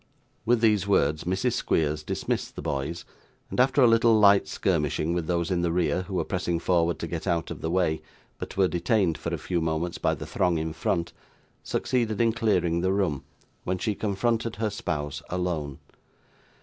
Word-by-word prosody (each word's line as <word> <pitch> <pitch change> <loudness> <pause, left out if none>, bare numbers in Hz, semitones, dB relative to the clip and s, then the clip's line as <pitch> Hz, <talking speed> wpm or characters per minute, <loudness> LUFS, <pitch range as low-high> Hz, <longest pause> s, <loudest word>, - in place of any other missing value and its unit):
With 120 -1 +3
these 105 -4 +3
words, 75 -6 +2
Mrs. 95 +7 0
Squeers 75 -1 0
dismissed - - -3
the - - -6
boys, 70 +5 -3 0.5
and - - -3
after 130 +2 +4
a - - +7
little 115 -1 +5
light 100 -1 +6
skirmishing 80 -3 0
with 85 -2 -2
those 85 -1 0
in 90 -1 +1
the 85 -1 0
rear 90 +1 +1
who 95 +1 -6
were 85 -3 0
pressing 90 -2 -1
forward 85 -1 +1
to 85 - -5
get 85 +3 -5
out 85 -2 0
of - - -7
the 80 - -2
way, 85 -3 +1 0.4
but - - -7
were 95 -1 +4
detained 90 0 +1
for - - -5
a - - -1
few 90 -2 -2
moments 80 +2 -2
by - - +1
the - - -7
throng 90 -2 +1
in 80 0 -3
front, 85 -1 -1 0.5
succeeded 115 -5 -1
in 115 -1 +3
clearing 90 -8 +1
the 95 +1 +1
room, 90 -8 0 0.4
when 90 +1 -1
she 105 +3 -1
confronted 110 +3 -1
her 110 0 -1
spouse 75 -7 -3
alone. 85 -6 -2
90 Hz, 190 wpm, -26 LUFS, 80-105 Hz, 0.5 s, a